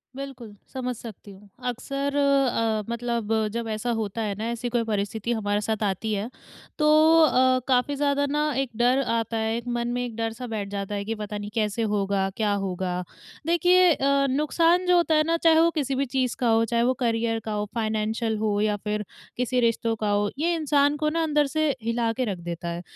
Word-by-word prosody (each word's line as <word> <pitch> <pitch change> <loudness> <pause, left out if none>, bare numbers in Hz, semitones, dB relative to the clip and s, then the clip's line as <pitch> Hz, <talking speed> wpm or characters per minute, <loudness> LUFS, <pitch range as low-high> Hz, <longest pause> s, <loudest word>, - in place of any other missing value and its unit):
बिल्कुल, 260 -6 -8 0.2
समझ 250 -1 -3
सकती 215 -3 -10
हूँ। 200 +1 -16 0.2
अक्सर 275 +3 -3
अ, 265 -6 +2
मतलब 235 -2 -2 0.2
जब 235 -1 -3
ऐसा 220 +3 -2
होता 215 +1 -3
है 205 -2 -2
ना, 225 - -2
ऐसी 235 +1 -3
कोई 240 -1 0
परिस्थिति 215 +2 -2
हमारे 205 -2 0
साथ 220 0 -2
आती 210 +2 -1
है, 210 +4 -2 0.5
तो 300 - +3 0.4
अ, 255 -2 +4
काफ़ी 260 +2 +2
ज़्यादा 285 0 +1
ना 300 +1 +1
एक 270 -2 0
डर 250 +3 +3
आता 230 0 -1
है 220 +1 0
एक, 240 +1 -7
मन 240 0 -1
में 245 0 -1
एक 235 - -7
डर-सा 225 +2 -4
बैठ 210 -3 -4
जाता 200 0 -4
है 200 0 -3
कि, 225 - -2
"पता 210 -1 -5
नहीं, 205 0 -6
कैसे 215 +1 0
होगा? 195 -1 0
क्या 210 -2 +1
होगा?" 180 -1 -3 0.4
देखिए 355 +1 +5
अ, 275 0 +2
नुकसान 330 +6 +2
जो 360 - +5
होता 330 -2 +3
है 305 - +4
ना, 335 0 +2
चाहे 325 -1 +4
वो 335 - +5
किसी 275 -1 -1
भी 275 +1 0
चीज़ 255 -1 -1
का 245 - +1
हो, 225 0 +4
चाहे 235 +1 +1
वो 255 +2 +3
करियर 225 -1 0
का - - -2
हो, 210 0 -1
फाइनेन्शियल 220 0 -1
हो 210 -1 0
या 210 -1 +1
फिर 210 -1 -2 0.3
किसी 250 0 0
रिश्तों 230 -1 +1
का 215 -1 -2
हो, 205 0 +1
ये 340 +3 +1
इंसान 290 -1 +2
को 305 0 0
ना 330 +1 0
अंदर 295 -2 +2
से 310 -1 +3
हिला 230 0 0
के 255 +2 -1
रख 200 -5 -3
देता 170 0 -6
है। 170 +1 -4
235 Hz, 210 wpm, -25 LUFS, 210-275 Hz, 0.5 s, देखिए